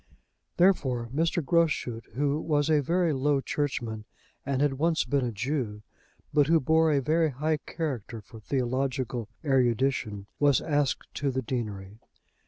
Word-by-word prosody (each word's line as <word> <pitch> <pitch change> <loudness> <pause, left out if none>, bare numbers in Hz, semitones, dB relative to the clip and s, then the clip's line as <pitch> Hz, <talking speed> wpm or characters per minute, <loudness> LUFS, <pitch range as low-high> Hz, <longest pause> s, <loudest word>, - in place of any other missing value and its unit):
Therefore, 130 -11 +2
Mr. 165 +1 0
Groschut, 145 -8 +1
who 145 +3 0
was 150 -1 +1
a 150 -1 +4
very 170 +2 +1
low 140 +1 +2
churchman 120 -7 -3 0.4
and 135 -1 -1
had 140 -2 +1
once 165 +1 +2
been 140 -2 +1
a 120 - -1
Jew, 110 -2 -3 0.5
but 145 -1 +4
who 165 +1 +5
bore 160 +3 +3
a 145 - +3
very 160 +3 +2
high 150 +4 -1
character 135 - -5
for 110 +2 -13
theological 125 -1 -2 0.2
erudition, 125 -5 +1
was 145 -3 +4
asked 145 -3 0
to 140 0 -1
the 130 0 -2
deanery. 105 -4 -5
135 Hz, 145 wpm, -28 LUFS, 120-150 Hz, 0.5 s, who